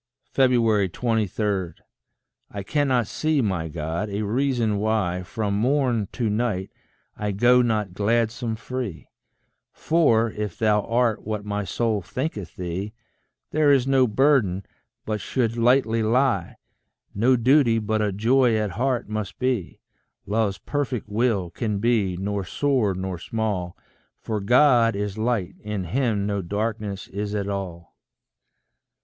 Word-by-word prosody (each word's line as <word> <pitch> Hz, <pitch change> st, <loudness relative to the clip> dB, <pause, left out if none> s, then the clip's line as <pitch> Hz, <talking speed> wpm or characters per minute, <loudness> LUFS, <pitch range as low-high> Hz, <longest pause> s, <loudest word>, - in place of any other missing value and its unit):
23. 110 Hz, -5 st, +1 dB, 0.8 s
I 100 Hz, -1 st, -6 dB
cannot 130 Hz, -1 st, +1 dB
see, 155 Hz, +7 st, 0 dB
my 95 Hz, -9 st, 0 dB
God, 80 Hz, +6 st, -3 dB
a 100 Hz, +2 st, -2 dB
reason 115 Hz, -2 st, 0 dB
why 105 Hz, -4 st, 0 dB
From 100 Hz, +2 st, -3 dB
morn 120 Hz, -1 st, +1 dB
to 120 Hz, -3 st, -1 dB
night 105 Hz, -3 st, -1 dB, 0.4 s
I 105 Hz, -1 st, -2 dB
go 120 Hz, +5 st, +4 dB
not 110 Hz, -6 st, 0 dB
gladsome 115 Hz, +3 st, 0 dB
free; 115 Hz, -5 st, -6 dB, 0.6 s
For, 115 Hz, -9 st, +2 dB
if 105 Hz, -4 st, -5 dB
thou 105 Hz, -1 st, +3 dB
art 115 Hz, -1 st, +1 dB
what 105 Hz, -1 st, -4 dB
my 105 Hz, 0 st, -2 dB
soul 110 Hz, +1 st, -1 dB
thinketh 105 Hz, -, -5 dB
thee, 95 Hz, +4 st, -4 dB, 0.6 s
There 150 Hz, -1 st, +4 dB
is 135 Hz, -3 st, +4 dB
no 135 Hz, -1 st, +4 dB
burden 110 Hz, -6 st, +2 dB, 0.4 s
but 110 Hz, -1 st, -2 dB
should 115 Hz, -3 st, -1 dB
lightly 120 Hz, -1 st, +3 dB
lie, 115 Hz, -4 st, +1 dB, 0.6 s
No 120 Hz, +6 st, +3 dB
duty 125 Hz, -1 st, +4 dB
but 110 Hz, 0 st, 0 dB
a 105 Hz, -1 st, +1 dB
joy 120 Hz, +4 st, +3 dB
at 105 Hz, -2 st, -1 dB
heart 125 Hz, +5 st, -1 dB
must 105 Hz, -2 st, -4 dB
be: 125 Hz, -8 st, -2 dB, 0.4 s
Love's 105 Hz, -1 st, 0 dB
perfect 130 Hz, -7 st, -3 dB
will 105 Hz, -5 st, 0 dB
can 110 Hz, -4 st, -2 dB
be 105 Hz, -4 st, +1 dB
nor 100 Hz, +1 st, -2 dB
sore 120 Hz, -, 0 dB
nor 95 Hz, -1 st, -4 dB
small, 100 Hz, -4 st, -3 dB, 0.4 s
For 110 Hz, -2 st, -3 dB
God 120 Hz, +1 st, +4 dB
is 105 Hz, +1 st, -3 dB
light 110 Hz, -5 st, 0 dB
in 105 Hz, -2 st, -4 dB
him 105 Hz, +1 st, 0 dB
no 100 Hz, -1 st, -1 dB
darkness 105 Hz, +1 st, -3 dB
is 105 Hz, +1 st, -4 dB
at 100 Hz, -1 st, -2 dB
all. 95 Hz, -4 st, -5 dB
110 Hz, 130 wpm, -24 LUFS, 100-120 Hz, 0.8 s, go